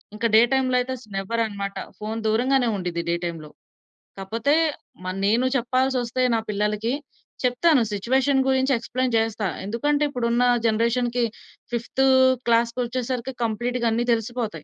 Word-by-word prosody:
ఇంకా 230 +2 0
డే 220 - +8
టైమ్‌లో 255 -1 +2
అయితే 260 +1 -4 0.2
నెవర్ 230 +4 -1
అన్నమాట. 200 -1 -5 0.2
ఫోన్ 220 +1 -4
దూరంగానే 245 +3 +2
ఉండిద్ది 175 -2 -3
డే 170 - +2
టైమ్‌లో. 165 -3 -6 0.7
కాపోతే 230 +9 0 0.5
మ - - -6 0.2
నేను 230 +5 +3
చెప్పాల్సొస్తే 255 0 0
నా 225 - +1
పిల్లలకి 210 +3 -1 0.5
చెప్తాను 255 +2 +3
సిచ్యువేషన్ 265 +6 +1
గురించి 265 +1 +2
ఎక్స్‌ప్లేన్ 250 +1 -2
చేస్తా. 225 -2 -1 0.2
ఎందుకంటే 290 +8 0
ఇప్పుడున్న 240 -1 +1 0.2
జనరేషన్‌కి 235 +2 +1 0.5
ఫిఫ్త్ 240 +3 -1 0.5
క్లాస్‌కొచ్చేసరికి 240 +2 0
కంప్లీట్‌గా 240 +2 -1
అన్ని 240 +2 0
తెలిసిపోతాయి. 230 0 -3
235 Hz, 125 wpm, -23 LUFS, 220-255 Hz, 0.7 s, డే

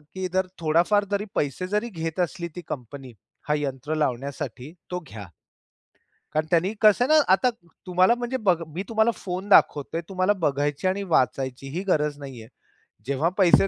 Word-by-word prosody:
की 190 0 -2
जर 185 0 +1
थोडाफार 170 +6 +3
जरी 200 +1 0
पैसे 145 +6 -1
जरी 210 +4 -1
घेत 165 -3 -5
असली 170 0 -2
ती 180 - -5
कंपनी 130 -1 -7 0.3
हा 150 - +2
यंत्र 145 +1 -3
लावण्यासाठी 135 -1 -3 0.2
तो 180 - -2
घ्या. 105 -6 -9 1.1
कारण 155 0 +1
त्यांनी 180 +4 +2
कसं 215 +3 +5
ना, 310 - +4 0.2
आता 250 +6 +3 0.4
तुम्हाला 185 +5 +4
म्हणजे 245 +2 -2
ब 195 - +5 0.2
मी 185 - -2
तुम्हाला 220 +1 +3
फोन 185 +2 -5
दाखवतोय. 165 -3 +4
तुम्हाला 185 +1 +2
बघायची 145 +4 0
आणि 195 +2 0
वाचायची 130 0 0
ही 175 +6 -3
गरज 150 -5 +1
नाहीये. 130 -6 -9 0.6
जेव्हा 140 +5 +1
पैसे 195 0 +5
170 Hz, 160 wpm, -25 LUFS, 140-195 Hz, 1.1 s, कसं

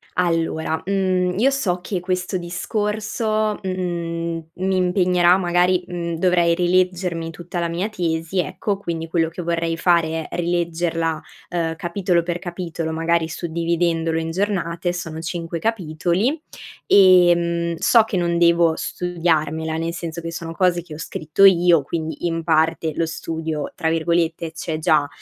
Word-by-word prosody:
Allora, 165 -2 0
mhmm, 185 -2 +1
io 260 +6 +4
so 195 -10 0
che 185 0 -3
questo 185 +1 -2
discorso, 210 +4 -1
mhmm, 170 -3 -3
mi 190 +1 0
impegnerà 180 -1 +3
magari, 180 0 +2
mhmm, 170 -1 -3
dovrei 170 -1 +3
rileggermi 180 -1 +1
tutta 175 +1 -6
la 170 - 0
mia 175 +5 -1
tesi 165 -2 -2
ecco, 195 +4 -1
quindi 165 -4 -4
quello 165 -1 +1
che 170 +2 -7
vorrei 165 -1 -1
fare 165 -2 +1
è - - -7
rileggerla, 170 -2 -1 0.3
ehm, 165 -2 -1
capitolo 175 +1 0
per 175 0 -3
capitolo 170 -2 -4
magari 165 0 +1
suddividendolo 165 -1 -1
in 165 0 -3
giornate- 175 -2 -1
sono 165 -2 -5
cinque 165 0 -4
capitoli- 190 - 0 0.5
ehm, 175 -3 +5
so 230 +7 +5
che 215 -3 -3
non 170 -1 +1
devo 170 -1 +4
studiarmela, 160 -3 -1
nel 165 +1 -2
senso 170 -1 -5
che 165 0 -5
sono 165 0 -6
cose 175 -1 +2
che 165 -3 -10
ho - - -8
scritto 160 +4 +1
io 175 -4 +6
quindi 160 +3 -4
in 165 -1 -1
parte 160 0 +1
lo 165 - +1
studio 160 -2 -4
tra 160 - 0
virgolette 165 0 0
"c'è 160 -1 -4
già". 155 -3 +3
170 Hz, 145 wpm, -21 LUFS, 165-180 Hz, 0.5 s, io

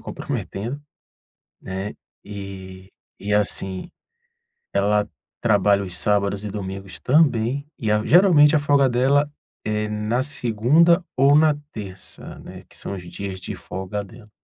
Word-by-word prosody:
comprometendo, 120 +9 -5 0.8
né. 95 +2 -5 0.3
E 95 -2 -9 0.3
e 105 +1 -3
assim, 95 -2 +1 0.9
ela 105 +1 +2 0.4
trabalha 100 -3 +3
os 90 -3 -4
sábados 100 0 +1
e - - -3
os 100 - -5
domingos 95 -1 -6
também, 135 -2 +2
e 110 -4 -2
a 105 0 +2
geralmente 160 -4 +6
a - - +4
folga 145 -2 +3
dela 135 +4 +2 0.3
é 105 0 -1
na 105 +4 -1
segunda 145 - +3
ou 140 +2 +5
na 155 -1 +5 0.2
terça, 95 -3 -6
né, - - -11
que - - -11
são - - -3
os 95 - -7
dias 95 +1 -6
de - - -5
folga 95 +2 -5
dela. 105 +2 -15
105 Hz, 135 wpm, -22 LUFS, 100-135 Hz, 0.9 s, geralmente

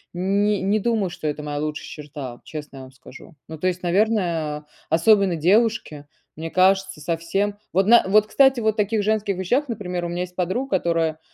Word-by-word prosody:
н 195 +3 +1 0.2
не 215 +1 +2
думаю, 215 -3 0
что 155 - -5
это 150 0 -3
моя 145 -1 -4
лучшая 150 0 -4
черта, 145 -5 -8
честно 150 -3 -8
я 135 - -8
вам 130 - -13
скажу. 130 +5 -15
Ну, 160 - -8
то 185 - 0
есть, 180 0 -2
наверное, 175 -6 0 0.2
особенно 190 +2 +4
девушке, 180 -4 +1 0.3
мне 160 +1 -6
кажется, 190 -2 +2
совсем 170 +6 -2 0.2
Вот, 190 +2 +2
на 235 +1 +7
вот 210 +2 +4
кстати, 265 +3 +4
вот 220 -2 +1
в - - -24
таких 210 +1 +1
женских 215 -2 0
вещах, 250 +10 0
например, 180 -6 -4
у - - -3
меня 175 +1 -3
есть 180 0 -6
подруга, 190 +6 -1
которая 165 -2 -1
180 Hz, 190 wpm, -22 LUFS, 155-210 Hz, 0.3 s, на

